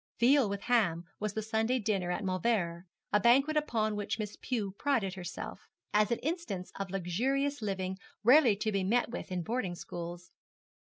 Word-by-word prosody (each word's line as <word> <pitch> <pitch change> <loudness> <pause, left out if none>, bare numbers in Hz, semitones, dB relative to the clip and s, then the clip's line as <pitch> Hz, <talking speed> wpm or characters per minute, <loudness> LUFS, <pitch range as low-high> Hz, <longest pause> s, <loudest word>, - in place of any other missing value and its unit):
Veal 255 -1 +5
with 200 0 -3
ham 200 -10 +2 0.2
was 210 -1 -3
the 220 - -1
Sunday 220 +3 +1
dinner 200 -6 0
at 180 +4 -1
Mauleverer, 185 -3 0 0.3
a 210 - +6
banquet 270 +8 +4
upon 225 -8 +1
which 205 +1 -2
Miss 210 -2 -4
Pew 220 -6 -2
prided 230 -10 +1
herself, 175 -2 -7 0.3
as 210 0 +4
an 235 - +1
instance 305 - -3
of 195 -1 -3
luxurious 250 +10 0
living 190 -2 -2 0.2
rarely 250 -2 +7
to 215 +2 -1
be 195 -2 0
met 230 +5 +1
with 240 - -6
in 180 -1 -1
boarding 205 -3 -2
schools. 175 0 -7
210 Hz, 170 wpm, -31 LUFS, 185-240 Hz, 0.3 s, rarely